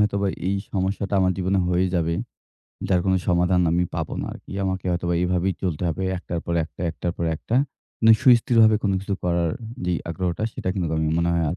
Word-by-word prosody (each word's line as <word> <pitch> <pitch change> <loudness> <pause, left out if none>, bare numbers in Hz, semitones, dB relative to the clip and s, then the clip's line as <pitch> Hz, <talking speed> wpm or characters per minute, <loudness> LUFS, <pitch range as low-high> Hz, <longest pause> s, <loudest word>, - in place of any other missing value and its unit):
হয়তোবা 100 -1 +1 0.2
এই 100 - +1 0.2
সমস্যাটা 100 +1 -1
আমার 95 0 +3
জীবনে 95 +1 +1
হয়ে 90 +1 +2
যাবে 85 -1 +1 0.7
যার 90 -2 +3
কোনো 95 -1 +3
সমাধান 90 +1 +3
আমি 85 +2 +2
পাবো - - -3
না - - -3
আরকি - - -11
আমাকে 95 -1 -2
হয়তোবা 85 0 0
এভাবেই 90 +1 +1
চলতে 90 -4 -2
হবে। 85 +3 -2 0.2
একটার 85 -1 -4
পর 85 - -1
একটা, 80 - -15
একটার 85 +1 -3
পর 85 - -2
একটা। 115 +8 -2 0.5
নে 115 - +9
সুস্থিরভাবে 115 -3 +5
কোনো 100 -2 +1
কিছু 100 0 -2
করার 85 -1 +1 0.3
যে 90 - 0 0.2
আগ্রহটা 90 +2 -2
সেটা - - -4
কিন্তু 90 -4 -1
আমি 80 0 +1
মনে 85 0 +1
হয় 85 -1 +1
আর 85 - -3
90 Hz, 195 wpm, -23 LUFS, 85-95 Hz, 0.7 s, নে